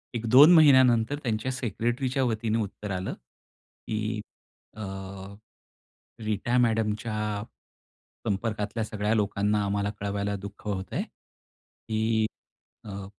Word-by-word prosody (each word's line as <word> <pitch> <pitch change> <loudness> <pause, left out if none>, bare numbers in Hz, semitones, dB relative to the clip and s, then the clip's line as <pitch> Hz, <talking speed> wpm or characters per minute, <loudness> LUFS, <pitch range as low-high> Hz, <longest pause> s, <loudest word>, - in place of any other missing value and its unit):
1-2 125 +8 +7
महिन्यानंतर 130 -5 +6
त्यांच्या 115 +1 -1
सेक्रेटरीच्या 125 +2 -1
वतीने 110 -2 0
उत्तर 105 0 -7
आलं, 95 0 -3 0.7
की 110 0 -2 0.6
अ, - - -6 1.4
रीता 110 +4 0
मॅडमच्या 105 -2 0 0.8
संपर्कातल्या 105 +1 -1
सगळ्या 105 0 -1
लोकांना 105 0 +1
आम्हाला 100 0 0
कळवायला 100 0 -2
दुःख 100 +2 -9
होतंय, 95 -2 -2
की 110 0 -4 0.6
अ 100 -2 -7
110 Hz, 90 wpm, -27 LUFS, 105-120 Hz, 1.4 s, 1-2